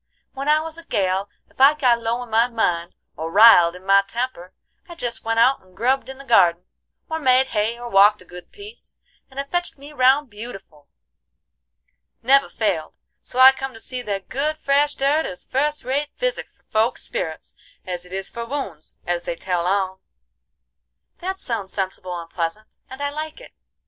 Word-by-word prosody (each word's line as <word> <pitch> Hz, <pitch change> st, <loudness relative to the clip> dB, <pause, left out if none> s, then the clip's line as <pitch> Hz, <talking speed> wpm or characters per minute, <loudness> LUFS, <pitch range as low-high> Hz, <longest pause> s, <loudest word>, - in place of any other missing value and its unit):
When 275 Hz, +1 st, -5 dB
I 305 Hz, +1 st, +5 dB
was 325 Hz, +1 st, -7 dB
a -, -, -12 dB
gal, 195 Hz, -, -1 dB, 0.2 s
ef -, -, -8 dB
I 280 Hz, +3 st, +7 dB
got 245 Hz, -5 st, +2 dB
low 230 Hz, +2 st, -2 dB
in 240 Hz, -, -13 dB
my 225 Hz, +2 st, +4 dB
mind, 175 Hz, -8 st, -1 dB, 0.2 s
or 160 Hz, +2 st, -5 dB
riled 195 Hz, -5 st, +7 dB
in 180 Hz, +1 st, -13 dB
my 195 Hz, 0 st, +6 dB
temper, 200 Hz, -3 st, -5 dB, 0.4 s
I 345 Hz, -, -9 dB
jest 245 Hz, -8 st, -4 dB
went 225 Hz, 0 st, -1 dB
out 260 Hz, +4 st, +4 dB
and 185 Hz, 0 st, -24 dB
grubbed 260 Hz, +3 st, +1 dB
in 265 Hz, -, -8 dB
the 275 Hz, -, -11 dB
gardin, 180 Hz, -9 st, +4 dB, 0.4 s
or 320 Hz, 0 st, -3 dB
made 260 Hz, -2 st, +4 dB
hay, 220 Hz, +2 st, 0 dB
or 240 Hz, 0 st, -7 dB
walked 205 Hz, -1 st, +5 dB
a 185 Hz, -, -16 dB
good 180 Hz, 0 st, -12 dB
piece, 420 Hz, +3 st, -13 dB, 0.3 s
and 265 Hz, 0 st, -9 dB
it 280 Hz, 0 st, -5 dB
fetched 350 Hz, -3 st, -2 dB
me 285 Hz, +2 st, -12 dB
round 265 Hz, 0 st, +3 dB
beautiful. 195 Hz, -9 st, -10 dB, 1.4 s
Never 275 Hz, +3 st, +4 dB
failed; 190 Hz, -8 st, -2 dB, 0.3 s
so -, -, -11 dB
I 260 Hz, +1 st, +10 dB
come 270 Hz, -2 st, -6 dB
to -, -, -11 dB
see 255 Hz, +2 st, -5 dB
that 200 Hz, -4 st, -4 dB
good 300 Hz, +4 st, -1 dB
fresh 285 Hz, 0 st, +1 dB
dirt 285 Hz, +4 st, +1 dB
is 180 Hz, -, -8 dB
fust 295 Hz, +3 st, -1 dB
rate 280 Hz, +4 st, -1 dB
physic -, -, -2 dB
for -, -, -35 dB
folk's 220 Hz, +3 st, 0 dB
spirits 160 Hz, -1 st, -5 dB, 0.3 s
as 180 Hz, -1 st, -5 dB
it 180 Hz, -, -16 dB
is 190 Hz, 0 st, -4 dB
for 235 Hz, -, -6 dB
wounds, 230 Hz, -, -6 dB
as 175 Hz, 0 st, -2 dB
they -, -, -3 dB
tell 180 Hz, 0 st, -2 dB
on." 190 Hz, -1 st, 0 dB, 1.2 s
"That 380 Hz, +2 st, -4 dB
sounds 220 Hz, -, -4 dB
sensible 185 Hz, -2 st, -4 dB
and 165 Hz, -, -9 dB
pleasant, 170 Hz, +5 st, -5 dB
and 265 Hz, +2 st, -7 dB
I 285 Hz, -, -1 dB
like 310 Hz, +4 st, -6 dB
it. -, -, -14 dB
235 Hz, 190 wpm, -22 LUFS, 190-275 Hz, 1.4 s, I